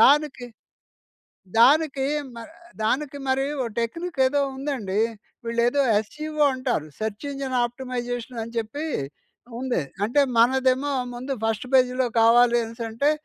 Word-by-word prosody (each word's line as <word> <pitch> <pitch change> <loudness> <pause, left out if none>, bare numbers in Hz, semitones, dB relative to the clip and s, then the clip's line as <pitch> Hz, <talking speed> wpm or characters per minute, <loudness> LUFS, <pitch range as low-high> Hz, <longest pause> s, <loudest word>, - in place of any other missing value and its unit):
దానికి, 275 -1 +4 1.1
దానికీ 280 +1 +4 0.3
మర్ 230 +6 -9 0.3
దానికి 285 +5 0
మరీ 265 +1 +1 0.2
ఓ - - -2
టెక్నిక్కేదో 280 +2 0
ఉందండి. 255 -8 -2 0.5
వీళ్ళేదో 235 +4 +2
యస్‌ఈవో 300 +8 -1
అంటారు, 250 - -2
సెర్చ్ 215 +4 -4
ఇంజన్ 270 -2 -3
ఆప్టిమైజేషన్ 245 -1 -5
అని 230 +1 -10
చెప్పీ 285 +8 -5 0.8
ఉందే. 250 - 0 0.2
అంటే, 265 +6 +3 0.2
మనదేమో 260 +3 +3 0.2
ముందు 260 +3 -4
ఫస్ట్ 225 +2 -1
పేజీ‌లో 255 0 +3
కావాలి 240 +1 +5
అనేసంటే, 230 +5 -1
255 Hz, 110 wpm, -24 LUFS, 230-280 Hz, 1.1 s, కావాలి